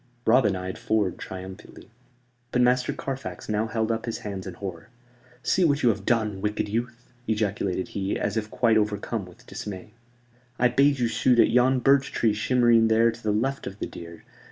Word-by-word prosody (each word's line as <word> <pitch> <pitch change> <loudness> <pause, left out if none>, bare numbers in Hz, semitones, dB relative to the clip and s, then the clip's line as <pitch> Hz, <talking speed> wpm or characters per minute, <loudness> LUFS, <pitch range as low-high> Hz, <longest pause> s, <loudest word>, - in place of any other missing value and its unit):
Robin 110 -4 +4
eyed 95 0 -5
Ford 105 -5 0
triumphantly. 95 +4 -9 0.6
But 125 - +3
Master 125 0 +2
Carfax 135 -1 -6
now 110 +1 0
held 110 0 -1
up 115 +1 -3
his 115 - -2
hands 95 -2 -5
in 90 - -7
horror. 95 -1 -7 0.5
"See 185 - +2
what 145 -3 +2
you 120 - +5
have 100 -3 -2
done, 110 -4 +1
wicked 105 0 -1
youth," 120 +2 -4 0.2
ejaculated 100 -4 -1
he, 100 0 -2
as 105 0 -2
if 110 -1 -2
quite 115 -2 +2
overcome 105 -1 -1
with 90 - -17
dismay. 100 0 -7 0.7
"I 125 - +4
bade 140 +3 +3
you 120 -2 +1
shoot 120 +2 +2
at - - +5
yon 125 +1 +3
birch 140 +1 +3
tree 110 -2 +1
shimmering 120 0 +3
there 115 +1 +4
to 115 +1 -13
the 110 - 0
left 135 +6 -1
of 95 0 -7
the - - -3
deer. 85 0 -10
110 Hz, 185 wpm, -25 LUFS, 100-120 Hz, 0.7 s, you